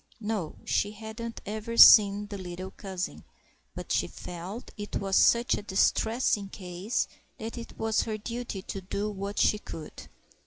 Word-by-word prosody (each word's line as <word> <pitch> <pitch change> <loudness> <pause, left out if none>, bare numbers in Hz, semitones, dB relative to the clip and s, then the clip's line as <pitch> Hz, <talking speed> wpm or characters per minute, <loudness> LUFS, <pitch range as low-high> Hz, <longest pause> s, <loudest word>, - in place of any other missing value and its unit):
No, 210 -7 -3
she 205 +1 0
hadn't 225 +2 -7
ever 220 +3 -4
seen 205 -1 +9
the 205 -1 -7
little 185 +1 -6
cousin, 190 -3 -5 0.5
but - - -7
she - - +2
felt 180 +7 -8
it 205 -1 -6
was 195 -1 0
such 235 +1 +5
a - - -1
distressing 210 +1 +1
case 185 +3 -3 0.3
that 225 +1 -6
it 235 -1 -9
was 220 -1 +1
her 215 -1 -3
duty 230 -3 -5
to 195 - -5
do 205 +3 -3
what 200 0 -5
she 210 - +3
could. 155 -6 -9
205 Hz, 155 wpm, -28 LUFS, 190-220 Hz, 0.5 s, seen